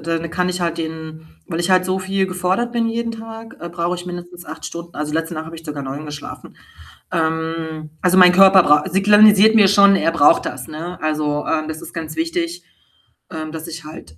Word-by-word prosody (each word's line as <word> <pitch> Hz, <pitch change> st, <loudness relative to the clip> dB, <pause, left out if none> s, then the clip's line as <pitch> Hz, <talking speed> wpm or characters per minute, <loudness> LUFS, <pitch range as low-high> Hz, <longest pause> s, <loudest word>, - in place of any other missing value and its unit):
dann 165 Hz, +1 st, -3 dB
kann 180 Hz, +1 st, -1 dB
ich 180 Hz, 0 st, -3 dB
halt 170 Hz, -1 st, -2 dB
den 160 Hz, 0 st, -7 dB, 0.2 s
weil 165 Hz, -, -3 dB
ich 175 Hz, -, -1 dB
halt 185 Hz, 0 st, +4 dB
so 185 Hz, +1 st, -1 dB
viel 190 Hz, 0 st, -1 dB
gefordert 185 Hz, +6 st, -1 dB
bin 230 Hz, -1 st, 0 dB
jeden 230 Hz, 0 st, -3 dB
Tag, 225 Hz, 0 st, -10 dB
äh, 170 Hz, -, -6 dB
brauche 170 Hz, +1 st, -2 dB
ich 180 Hz, 0 st, -8 dB
mindestens 175 Hz, -1 st, -9 dB
8 155 Hz, +1 st, -9 dB
Stunden. 170 Hz, 0 st, -8 dB
Also, 150 Hz, 0 st, -4 dB
letzte 165 Hz, +2 st, -2 dB
Nacht 155 Hz, 0 st, -5 dB
habe 165 Hz, +1 st, -10 dB
ich 165 Hz, -, -13 dB
sogar 145 Hz, -2 st, -6 dB
9 140 Hz, +3 st, -6 dB
geschlafen. 145 Hz, -1 st, -9 dB, 0.6 s
Ähm, 160 Hz, -1 st, -3 dB
also, 185 Hz, +1 st, +3 dB
mein 180 Hz, -1 st, +7 dB
Körper 190 Hz, 0 st, +7 dB
brau 150 Hz, 0 st, +4 dB
signalisiert 210 Hz, +2 st, +6 dB
mir 205 Hz, -3 st, +6 dB
schon, 200 Hz, 0 st, +6 dB
er 165 Hz, -, +1 dB
braucht 165 Hz, 0 st, +4 dB
das, -, -, -6 dB
ne? 165 Hz, +3 st, -7 dB
Also, 150 Hz, -1 st, -1 dB
äh, 155 Hz, -1 st, -1 dB
das 160 Hz, 0 st, -6 dB
ist 165 Hz, -, -10 dB
ganz 160 Hz, -2 st, -6 dB
wichtig, 335 Hz, +1 st, -3 dB, 0.7 s
ähm, 155 Hz, -1 st, -6 dB
dass 160 Hz, +1 st, -7 dB
ich 165 Hz, -1 st, -8 dB
halt 85 Hz, -, -12 dB
170 Hz, 210 wpm, -19 LUFS, 160-190 Hz, 0.7 s, mein